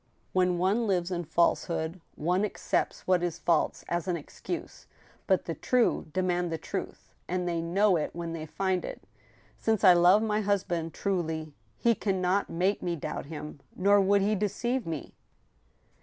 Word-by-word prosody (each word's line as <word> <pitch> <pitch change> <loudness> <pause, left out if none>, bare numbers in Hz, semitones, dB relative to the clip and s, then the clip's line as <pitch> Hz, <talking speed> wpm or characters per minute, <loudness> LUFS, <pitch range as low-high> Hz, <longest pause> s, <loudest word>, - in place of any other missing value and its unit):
" - - -40
When 180 -1 +2
one 200 +6 +1
lives 180 -2 0
in 175 -1 -2
falsehood 165 +1 0
one 180 +5 +1
accepts 210 - -1
what 185 -1 +3
is 175 -2 -2
false 165 -3 +1
as 175 +1 -2
an 175 -2 0
excuse; 330 - -7 0.4
but - - +2
the - - -2
true 250 -8 +1
demand 180 0 0
the 165 - -1
truth, - - -6 0.2
and 180 0 -1
they 170 -1 0
know 185 +3 +3
it 150 - -1
when 170 -1 -4
they 160 -1 -5
find 185 +3 -1
it. - - -7 0.6
Since 220 - +1
I 185 -3 +9
love 180 +5 +5
my 215 -1 +1
husband 175 -5 -1
truly, 160 -5 -2 0.2
he 235 - +3
can 195 -3 -1
not 185 +2 +1
make 185 +4 0
me 175 -1 -1
doubt 150 -2 -5
him; 150 -1 -7 0.2
nor 200 +2 +4
would 200 +1 +3
he 210 +2 +2
deceive 215 +5 -1
me." 160 -3 -5
180 Hz, 170 wpm, -29 LUFS, 170-200 Hz, 0.6 s, I